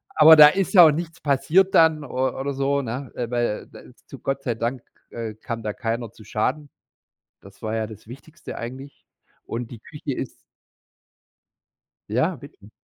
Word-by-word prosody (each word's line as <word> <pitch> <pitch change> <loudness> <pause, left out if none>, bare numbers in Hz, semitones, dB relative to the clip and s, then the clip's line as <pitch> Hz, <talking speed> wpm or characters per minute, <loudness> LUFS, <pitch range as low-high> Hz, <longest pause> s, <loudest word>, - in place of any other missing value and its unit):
Aber 160 +1 +9
da 150 -1 +10
ist 195 +5 -1
ja 175 -3 +10
auch 155 - +6
nichts 165 +1 -5
passiert 150 +7 +2
dann 160 -2 +4
o 130 -1 -2
oder 140 +1 -2
so, 140 +1 0
ne? 125 +2 -5
Äh, 120 -2 -3
weil, 120 -1 +1 0.2
äh, - - -19
da - - -12
ist - - -19
zu - - -10
Gott 135 0 -3
sei 120 -4 -1
Dank, 120 +2 -3 0.3
äh, 115 -2 -6
kam 115 0 -6
da 105 - -2
keiner 115 -2 -4
zu 110 - -16
Schaden. 135 +8 -2 0.7
Das - - -17
war 110 0 -3
ja 110 -1 -2
das 110 -1 -13
Wichtigste 145 +7 -11
eigentlich. 130 +4 -9 0.4
Und 115 +1 -5
die 115 - -9
Küche 145 +1 -6
ist 130 - -5 1.8
Ja, 130 - +1
richtig. 125 -8 -15
135 Hz, 180 wpm, -23 LUFS, 115-150 Hz, 1.8 s, da